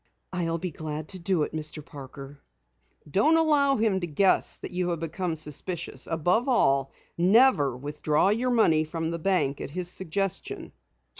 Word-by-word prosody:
"I'll 165 -2 -1
be 180 +1 -4
glad 155 0 -6
to 185 - -2
do 170 -2 +1
it, - - -5
Mr. 155 -1 -4
Parker." 140 0 -11 0.7
"Don't 290 - +3
allow 290 -4 +3
him 215 -4 +1
to 175 - -3
guess 185 +5 +2
that - - -8
you 180 0 -1
have 170 -2 -2
become 165 +1 -3
suspicious. 160 +3 -3
Above 175 - +1
all, 135 - +2 0.3
never 180 - +4
withdraw 150 +5 0
your 235 +5 +1
money 170 -10 +3
from 160 +1 -4
the 170 - -4
bank 155 -6 0
at - - -5
his 175 +3 -4
suggestion." 190 +1 -3
170 Hz, 160 wpm, -26 LUFS, 150-195 Hz, 0.7 s, never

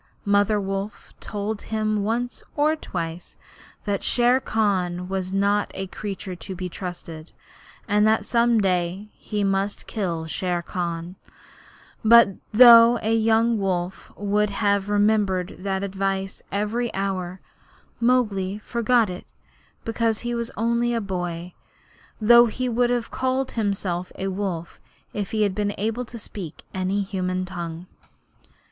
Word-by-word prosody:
Mother 205 +1 +3
Wolf 195 +1 -5
told 210 0 -4
him 215 -1 -1
once 240 +4 -2
or 305 +2 +3
twice 170 - -6 0.5
that 200 -2 -1
Shere 245 +1 +3
Khan 185 -7 0
was 190 -1 -3
not 200 +1 +1
a 195 - -3
creature 190 -1 -6
to 185 +3 -7
be 180 0 -4
trusted, 170 -3 -8 0.6
and 210 +1 +3
that 220 0 +2
some 235 -1 +3
day 185 +1 -1
he 210 -1 -3
must 195 +1 -1
kill 175 -7 -3
Shere 175 +2 -2
Khan; 170 +1 -4 0.9
but 230 -1 +8 0.2
though 235 +1 +9
a 220 +1 +1
young 225 0 +3
wolf 185 -1 -2
would 205 +1 +1
have 200 0 0
remembered 205 -3 +1
that 190 0 -2
advice 195 0 -2
every 220 +4 -1
hour, 190 -2 -2 0.6
Mowgli 210 -6 +1
forgot 235 +1 +2
it 180 -1 -7 0.6
because 225 -1 0
he 240 0 -3
was 235 -1 -2
only 235 +2 +1
a - - +1
boy 180 -3 -4 0.7
though 235 +2 +7
he 255 +3 -2
would 240 0 +2
have 240 -1 -1
called 260 0 -1
himself 195 -5 -2
a 195 - -2
wolf 185 -4 -4 0.3
if 205 -2 -3
he 220 -1 +1
had 200 -2 +1
been 205 0 -1
able 225 +4 -2
to 235 - -9
speak 185 -7 -8
in 190 - -3
any 195 +2 0
human 185 -1 -2
tongue. 170 -2 -6
200 Hz, 140 wpm, -24 LUFS, 185-225 Hz, 0.9 s, though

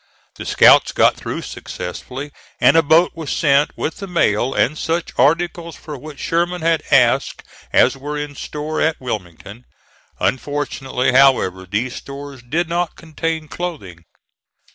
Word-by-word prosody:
The - - -7
scouts - - +6
got - - +4
through - - -5
successfully, 130 +10 -7 0.3
and - - +5
a 165 - +7
boat 160 +3 +4
was 160 -4 -7
sent 140 0 +2
with 160 - -3
the 200 - -7
mail 130 - +1
and 135 +2 +1
such 165 +2 -2
articles 170 +2 +1
for 150 -3 -9
which 145 +2 -10
Sherman 175 +3 -1
had 165 -1 +2
asked 135 -1 +3 0.3
as - - +4
were 145 +2 -5
in 145 0 -5
store 150 +2 -4
at 160 0 +1
Wilmington; 105 -1 -7 0.6
unfortunately, 135 -1 -1
however, 125 -9 +3
those 115 +7 -2
stores 140 -1 -9
did 160 +8 -1
not 170 0 -2
contain 160 -1 -4
clothing. 105 - -6
145 Hz, 140 wpm, -19 LUFS, 130-165 Hz, 0.6 s, a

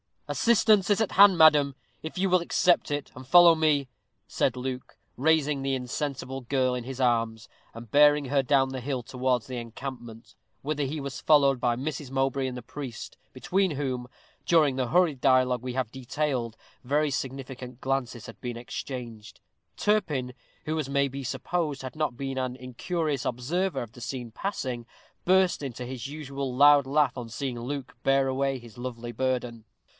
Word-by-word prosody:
"Assistance 215 -4 +3
is 205 +1 +3
at 220 - 0
hand, 195 -2 +7
madam, 150 -4 +6 0.3
if 160 +3 -7
you 190 +1 +1
will 185 0 +4
accept 175 0 +2
it, 145 -1 -3
and 130 0 -11
follow 175 +2 +8
me," 150 -4 +1 0.4
said 130 - 0
Luke, 125 0 -5 0.2
raising 150 0 +2
the 135 0 0
insensible 135 +1 -4
girl 130 0 0
in 125 -1 -4
his 130 0 -5
arms, 115 -2 0 0.2
and 115 -1 -11
bearing 145 0 +5
her 140 +1 +2
down 135 0 +2
the 130 0 -5
hill 130 -1 -3
towards 125 -1 -1
the 130 -1 -5
encampment, 115 -2 -8 0.3
whither 145 0 -2
he 150 +2 -4
was 140 -1 -5
followed 140 -4 +4
by 120 -1 +1
Mrs. 140 +1 -4
Mowbray 135 0 0
and 125 - -5
the - - -6
priest, 130 -2 -8 0.2
between 185 +7 0
whom, 130 -4 -3 0.4
during 155 -6 +4
the 130 -2 0
hurried 165 -3 +2
dialogue 130 -2 +3
we 125 0 -5
have 125 -3 -2
detailed, 130 -3 -2 0.3
very 145 +3 +1
significant 130 -1 -6
glances 130 -3 -2
had - - -11
been 120 -2 -5
exchanged. 120 -3 -7 0.4
Turpin, 155 -12 0 0.3
who, 155 +1 -1
as 150 - -2
it - - -8
may 140 0 +2
be 135 0 -6
supposed, 150 +2 -2
had 130 -1 -7
not 150 -6 -2
been 135 -1 -4
an 130 -1 -2
incurious 140 +4 -3
observer 145 +6 -1
of 115 - -11
the 120 - -14
scene 125 -1 -5
passing, 125 - -4 0.4
burst 185 -2 +3
into 125 -3 -5
his 130 0 -6
usual 140 -3 -5
loud 145 0 +6
laugh 145 -1 +2
on 120 -2 -5
seeing 125 +1 -4
Luke 130 +1 -5
bear 135 0 +3
away 135 0 0
his 120 -3 -14
lovely 120 -1 -6
burden. 120 -2 -2
135 Hz, 175 wpm, -27 LUFS, 125-150 Hz, 0.4 s, follow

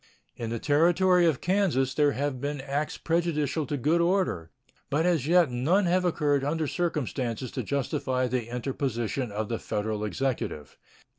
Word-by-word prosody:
In 115 -2 -5
the 115 - -2
Territory 175 +6 +3
of 155 -5 0
Kansas 175 -9 +1
there 145 0 +3
have 140 -2 -2
been 145 0 -3
acts 140 +2 -3
prejudicial 160 -3 0
to 145 - -2
good 155 +6 +2
order, 170 - 0 0.4
but 155 +4 +1
as 165 -6 +1
yet 170 -4 +4
none 160 +12 +2
have 180 +1 +2
occurred 145 -5 +1
under 155 +3 0
circumstances 135 - -2
to - - -3
justify 135 -2 -1
the 125 -2 -2
interposition 125 -1 -2
of 105 +1 -3
the 115 0 -3
Federal 105 0 -3
Executive. 105 - -3
140 Hz, 155 wpm, -27 LUFS, 125-165 Hz, 0.4 s, yet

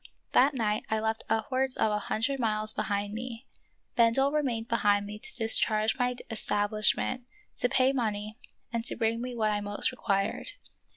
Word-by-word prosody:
That 275 +3 +4
night 215 -3 0
I 220 - +1
left 220 0 -2
upwards 255 +4 0
of 220 - +2
a 210 - 0
hundred 230 +6 -2
miles 215 -2 +1
behind 205 0 -2
me. 235 +2 -6 0.5
Bendel 240 +4 +3
remained 250 -7 -1
behind 205 -3 +2
me 210 +1 -8
to - - -9
discharge 220 0 +3
my 250 0 +1
es 225 -2 -3
tablishment, 215 +4 +1 0.4
to 245 - +3
pay 260 +2 +3
money, 215 -4 -2 0.4
and 230 -1 -1
to - - +6
bring 230 0 0
me 250 0 -5
what 215 -2 +1
I 205 0 -1
most 205 +3 0
required. 195 - -2
225 Hz, 170 wpm, -29 LUFS, 210-250 Hz, 0.5 s, to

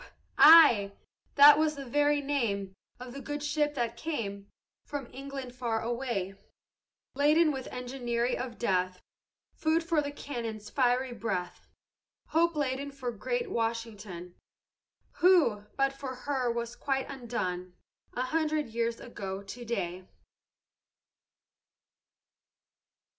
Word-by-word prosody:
ay; 290 -12 +8 0.4
that 290 +1 +9
was 310 -1 +1
the 275 -1 -7
very 290 +3 +2
name 225 -9 -1 0.3
Of 250 -1 -8
the 275 - -7
good 290 +1 -5
ship 295 0 0
that 235 -3 -1
came 200 -10 -4 0.4
From 285 -2 -5
England 270 -2 -7
far 235 -3 -2
away, 235 -5 -3 0.8
Laden 305 +3 +4
with 265 -2 -5
enginery 245 -1 -2
of 245 -2 -5
death, 185 -4 -1 0.5
Food 320 +1 +1
for 330 -2 +1
the 285 - -4
cannon's 230 -7 -6
fiery 255 -1 +1
breath; 195 -7 -4 0.6
Hope 335 +1 +2
laden 280 -1 -2
for 265 -3 -4
great 475 - -3
Washington, 215 - -4 0.8
Who, 325 - +4
but 275 0 +2
for 270 -1 -6
her, 255 -1 -1
was 235 0 -4
quite 270 -1 -2
undone 185 -9 -4 0.4
A 250 - -1
hundred 310 0 0
years 230 0 -2
ago 195 -4 -6
to 230 +5 -8
day. 185 -5 -3
250 Hz, 115 wpm, -30 LUFS, 225-290 Hz, 0.8 s, that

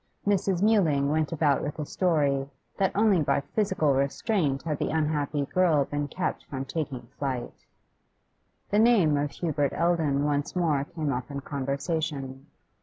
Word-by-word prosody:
Mrs. 195 -2 +1
Mewling 160 -11 +3
went 155 -1 0
about 150 -4 +2
with 145 +1 -4
a 150 - -3
story, 145 -6 +1 0.3
that 195 -2 +2
only 205 -4 +4
by 140 - +1
physical 190 -3 0
restraint 140 - 0
had 150 -3 -2
the - - -1
unhappy 150 -2 0
girl 160 -3 +2
been 145 +1 -3
kept 185 - -3
from 135 -1 -5
taking 135 -5 -4
flight. 130 -4 -4 1.0
The 205 - +3
name 215 -10 +5
of 145 0 0
Hubert 145 -2 -1
Eldon 160 -5 +1
once 145 +2 -1
more 155 -6 +1
came 155 -4 -3
up 125 +2 -4
in 140 -1 -5
conversation. 140 -1 -3
150 Hz, 150 wpm, -27 LUFS, 140-175 Hz, 1.0 s, name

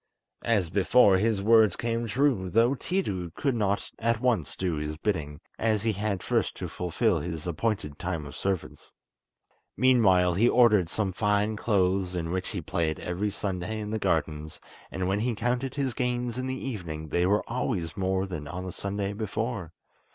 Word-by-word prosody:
As 100 -8 +1
before, 100 +1 +5
his 105 -1 +1
words 110 -2 +5
came 115 0 -2
true, 115 -5 +1
though 115 +7 +4
Tiidu 125 - -2
could 140 -3 0
not 100 -3 -1
at 115 0 +1
once 115 - 0
do 90 -4 -1
his 75 +1 -4
bidding, 80 -6 -2 0.2
as 110 -2 +1
he 115 - +2
had 100 -2 -2
first - - 0
to - - -4
fulfil 90 +2 0
his 80 0 -5
appointed 85 -4 -2
time 85 -4 -3
of 70 - -9
service. 95 -3 -4 0.8
Meanwhile 95 -9 +4
he 110 +7 +4
ordered 105 -8 +5
some 100 -1 -1
fine 105 +2 +1
clothes, 95 -4 +1
in 85 -1 -2
which 95 0 -2
he 100 -6 -4
played 80 -1 -1
every 90 +4 -2
Sunday 100 +1 -3
in 105 0 -5
the 110 - -1
gardens, 75 -5 -1 0.3
and 95 -1 -2
when 100 +2 +1
he 120 +1 0
counted 125 +4 -1
his 135 -3 -1
gains 125 0 -1
in 130 - -2
the 130 +1 -4
evening 80 - -5
they 90 +3 +2
were 105 +2 +1
always 115 -8 -2
more 95 0 0
than 80 -6 -6
on 90 +4 -5
the 95 - -4
Sunday 100 +2 -3
before. 110 -3 -3
100 Hz, 175 wpm, -27 LUFS, 90-115 Hz, 0.8 s, before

